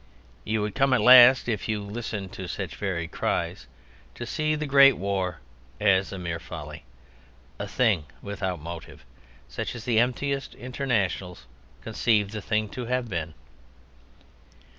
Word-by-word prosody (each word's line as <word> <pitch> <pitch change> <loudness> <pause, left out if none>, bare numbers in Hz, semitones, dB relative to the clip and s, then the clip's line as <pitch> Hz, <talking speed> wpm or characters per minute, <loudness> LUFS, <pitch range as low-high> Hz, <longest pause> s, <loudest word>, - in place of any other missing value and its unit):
You 110 0 -1
would 105 - -3
come 135 -1 +2
at - - +3
last 125 0 +8
(if 110 -3 -2
you 110 -1 0
listened 105 -2 -5
to 95 -2 -7
such 85 -6 -5
varied 85 -2 -3
cries) - - -2 0.5
to 120 - -6
see 155 +5 -1
the 150 0 -3
Great 140 -1 +6
War 95 -2 -2 0.4
as 95 -2 +3
a 100 - -5
mere 85 -2 -4
folly, - - -9 0.7
a - - -4
thing 105 -11 +1
without 95 -3 -4
motive, 80 -5 -9 0.4
such 65 - -5
as 115 - -8
the 115 -3 +3
emptiest 135 +3 -1
internationals 105 - -2 0.4
conceive 105 -4 +1
the 110 -1 -5
thing 110 +2 0
to 125 +2 -6
have 125 0 -1
been. 80 -4 -4
105 Hz, 145 wpm, -26 LUFS, 95-125 Hz, 0.7 s, last